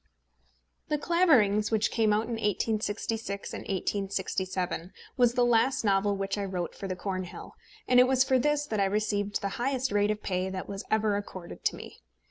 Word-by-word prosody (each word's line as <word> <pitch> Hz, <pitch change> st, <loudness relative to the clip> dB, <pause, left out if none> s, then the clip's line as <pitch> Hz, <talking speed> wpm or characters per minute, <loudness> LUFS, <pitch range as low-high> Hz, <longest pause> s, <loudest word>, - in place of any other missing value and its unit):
The 300 Hz, -, 0 dB
Claverings, 265 Hz, -, +3 dB
which 220 Hz, -1 st, +1 dB
came 220 Hz, -2 st, +2 dB
out 210 Hz, +1 st, +2 dB
in 230 Hz, -, -8 dB
1866 215 Hz, -1 st, -2 dB
and -, -, -5 dB
1867, 190 Hz, -2 st, -2 dB, 0.2 s
was 245 Hz, -2 st, +3 dB
the 245 Hz, -, +4 dB
last 240 Hz, +3 st, +3 dB
novel 200 Hz, 0 st, +2 dB
which 195 Hz, +1 st, -2 dB
I -, -, -1 dB
wrote 180 Hz, -3 st, -3 dB
for 195 Hz, -, -6 dB
the 185 Hz, -, -3 dB
Cornhill; 185 Hz, -1 st, -5 dB, 0.3 s
and 250 Hz, 0 st, +5 dB
it 250 Hz, -, +7 dB
was 260 Hz, 0 st, +4 dB
for 260 Hz, -1 st, +2 dB
this 295 Hz, +2 st, +1 dB
that 220 Hz, -7 st, -2 dB
I 200 Hz, -, +3 dB
received 205 Hz, 0 st, -1 dB
the 200 Hz, -, -1 dB
highest 265 Hz, -1 st, 0 dB
rate 205 Hz, 0 st, +2 dB
of 210 Hz, 0 st, -2 dB
pay 185 Hz, 0 st, -1 dB
that 190 Hz, -1 st, -5 dB
was 200 Hz, 0 st, -5 dB
ever 215 Hz, -1 st, +2 dB
accorded 185 Hz, -3 st, -8 dB
to -, -, +2 dB
me. -, -, -11 dB
210 Hz, 185 wpm, -28 LUFS, 195-240 Hz, 0.3 s, it